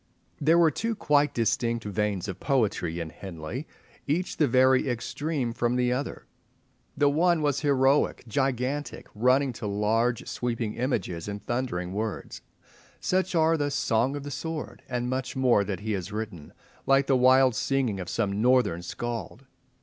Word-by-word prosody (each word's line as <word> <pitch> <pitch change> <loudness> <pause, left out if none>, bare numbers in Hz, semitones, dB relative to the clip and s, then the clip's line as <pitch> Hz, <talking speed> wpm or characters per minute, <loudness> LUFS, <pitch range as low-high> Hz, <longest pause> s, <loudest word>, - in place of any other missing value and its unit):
There 160 +3 +4
were 165 -2 +5
two 225 +9 -2
quite 150 -7 +2
distinct 115 -1 0
veins 105 -2 -1
of 95 -2 -6
poetry 105 - 0
in 80 -2 -5
Henley, 95 - -7 0.4
each 170 +6 -1
the 150 - +3
very 130 +1 +4
extreme 125 +1 -2
from 120 +1 0
the 125 0 +2
other. 135 +3 -4 0.7
The 145 - +4
one 165 +2 +3
was 145 -2 +1
heroic, 140 -1 +2
gigantic, 135 +3 -2
running 125 +4 +2
to 110 - -5
large 110 +4 0
sweeping 115 -3 -2
images 105 - -2
and 100 0 -6
thundering 120 -8 -2
words. 110 +1 -4 0.6
Such 185 0 0
are 160 0 +4
the 145 -1 0
"Song 130 -1 +1
of 145 - -5
the 145 - -6
Sword" 160 +3 -5
and 125 -1 -2
much 130 0 -3
more 125 -6 +3
that 95 -1 -4
he 110 +1 -3
has 95 -1 -3
written, 105 -8 -6 0.4
like 135 0 +4
the 135 - +3
wild 130 0 +5
singing 125 -6 0
of 90 - -5
some 105 -2 -1
Northern 125 -8 +3
scald. 115 +3 -5
125 Hz, 155 wpm, -27 LUFS, 105-140 Hz, 0.7 s, were